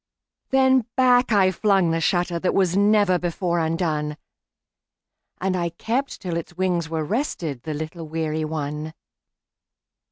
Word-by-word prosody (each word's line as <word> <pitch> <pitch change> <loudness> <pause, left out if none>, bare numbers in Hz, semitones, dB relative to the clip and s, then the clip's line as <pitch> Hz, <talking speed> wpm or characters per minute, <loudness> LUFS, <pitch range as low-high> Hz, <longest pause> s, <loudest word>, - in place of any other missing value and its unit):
Then 260 -3 +3
back 250 -1 +4
I 195 -3 +4
flung 190 -3 +2
the 165 - 0
shutterThat 175 0 0
was 185 -2 +2
never 205 -2 +4
before 175 0 -1
undone, 160 -2 -1 1.2
And 190 0 0
I 170 -1 -1
kept 235 +11 -3
till 175 -3 -3
its 170 +1 -7
wings 180 -3 0
were 160 -1 -2
restedThe 160 - -3
little 160 +1 -6
weary 155 0 -2
one. 155 0 -4
175 Hz, 125 wpm, -23 LUFS, 160-200 Hz, 1.2 s, back